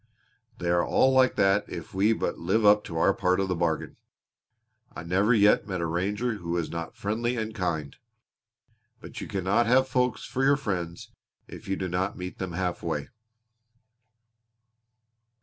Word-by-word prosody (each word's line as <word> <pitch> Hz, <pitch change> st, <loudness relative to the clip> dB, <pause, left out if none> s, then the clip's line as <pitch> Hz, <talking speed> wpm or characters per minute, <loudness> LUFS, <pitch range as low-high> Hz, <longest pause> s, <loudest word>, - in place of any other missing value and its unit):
"They 85 Hz, 0 st, -1 dB
are 85 Hz, 0 st, +3 dB
all 130 Hz, -, +3 dB
like 130 Hz, -1 st, +4 dB
that 95 Hz, +1 st, +3 dB
if 85 Hz, -, -8 dB
we 100 Hz, +4 st, +3 dB
but 110 Hz, -, -2 dB
live 100 Hz, +6 st, +1 dB
up 105 Hz, 0 st, +6 dB
to 85 Hz, -5 st, -6 dB
our 100 Hz, +4 st, +3 dB
part 90 Hz, 0 st, +1 dB
of 95 Hz, -1 st, -1 dB
the 90 Hz, -, 0 dB
bargain. 85 Hz, -2 st, -2 dB, 1.0 s
I -, -, -6 dB
never 95 Hz, +6 st, +2 dB
yet 105 Hz, -3 st, +4 dB
met 95 Hz, -3 st, -3 dB
a 85 Hz, -, -1 dB
ranger 105 Hz, +8 st, -1 dB
who 85 Hz, -3 st, -9 dB
was 85 Hz, -2 st, -2 dB
not 85 Hz, -1 st, -5 dB
friendly 115 Hz, +4 st, -2 dB
and 110 Hz, -1 st, -3 dB
kind. 85 Hz, -8 st, -3 dB, 1.0 s
But -, -, -9 dB
you -, -, -6 dB
cannot 100 Hz, +4 st, +1 dB
have 130 Hz, +2 st, +4 dB
folks 125 Hz, -2 st, 0 dB
for 130 Hz, -, -2 dB
your 140 Hz, +1 st, +4 dB
friends 90 Hz, -, -4 dB, 0.4 s
if -, -, -11 dB
you 95 Hz, -, 0 dB
do 95 Hz, -, -3 dB
not 95 Hz, +3 st, -2 dB
meet 90 Hz, 0 st, -7 dB
them 95 Hz, -2 st, -4 dB
half 90 Hz, 0 st, -2 dB
way." 75 Hz, -4 st, -3 dB
95 Hz, 170 wpm, -27 LUFS, 85-110 Hz, 1.0 s, up